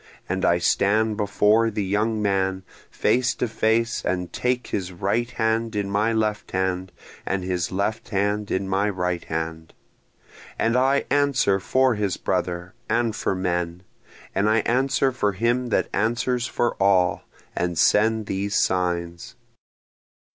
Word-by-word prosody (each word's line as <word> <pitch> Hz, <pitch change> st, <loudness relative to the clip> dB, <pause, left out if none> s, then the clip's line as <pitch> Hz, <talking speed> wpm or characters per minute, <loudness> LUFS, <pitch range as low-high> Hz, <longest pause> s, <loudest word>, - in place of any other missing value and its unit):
And 95 Hz, +1 st, -2 dB
I 85 Hz, -, +4 dB
stand 105 Hz, +5 st, +2 dB
before 105 Hz, +2 st, +2 dB
the 105 Hz, -2 st, -2 dB
young 105 Hz, +2 st, 0 dB
man 95 Hz, -1 st, 0 dB, 0.3 s
face 125 Hz, 0 st, +1 dB
to 125 Hz, -, -1 dB
face, 115 Hz, +1 st, 0 dB
and 90 Hz, -1 st, -2 dB
take 125 Hz, 0 st, -1 dB
his 95 Hz, -2 st, -3 dB
right 100 Hz, +7 st, -1 dB
hand 115 Hz, -1 st, -1 dB
in 100 Hz, -1 st, -2 dB
my 105 Hz, +3 st, +1 dB
left 110 Hz, -2 st, -1 dB
hand 95 Hz, -1 st, -1 dB, 0.3 s
and 95 Hz, -1 st, -2 dB
his 90 Hz, -1 st, -2 dB
left 105 Hz, +5 st, -2 dB
hand 105 Hz, 0 st, -1 dB
in 95 Hz, +1 st, -1 dB
my 100 Hz, +2 st, +1 dB
right 90 Hz, -3 st, -2 dB
hand, 80 Hz, 0 st, -5 dB, 0.8 s
And 115 Hz, +1 st, +1 dB
I 135 Hz, +2 st, +2 dB
answer 140 Hz, -9 st, +2 dB
for 130 Hz, +7 st, +2 dB
his 105 Hz, -3 st, -1 dB
brother 90 Hz, 0 st, -2 dB, 0.2 s
and 115 Hz, -2 st, +1 dB
for 95 Hz, -, -1 dB
men, 90 Hz, -1 st, -2 dB, 0.5 s
and 100 Hz, +2 st, +2 dB
I 110 Hz, +1 st, +3 dB
answer 130 Hz, +3 st, +1 dB
for 105 Hz, -5 st, 0 dB
him 120 Hz, +5 st, 0 dB
that 120 Hz, -, +1 dB
answers 120 Hz, +3 st, 0 dB
for 120 Hz, -, 0 dB
all, 95 Hz, -2 st, +3 dB, 0.3 s
and 85 Hz, -1 st, -1 dB
send 110 Hz, +5 st, +3 dB
these 100 Hz, +1 st, -2 dB
signs. 85 Hz, -2 st, -1 dB
105 Hz, 145 wpm, -24 LUFS, 95-115 Hz, 0.8 s, I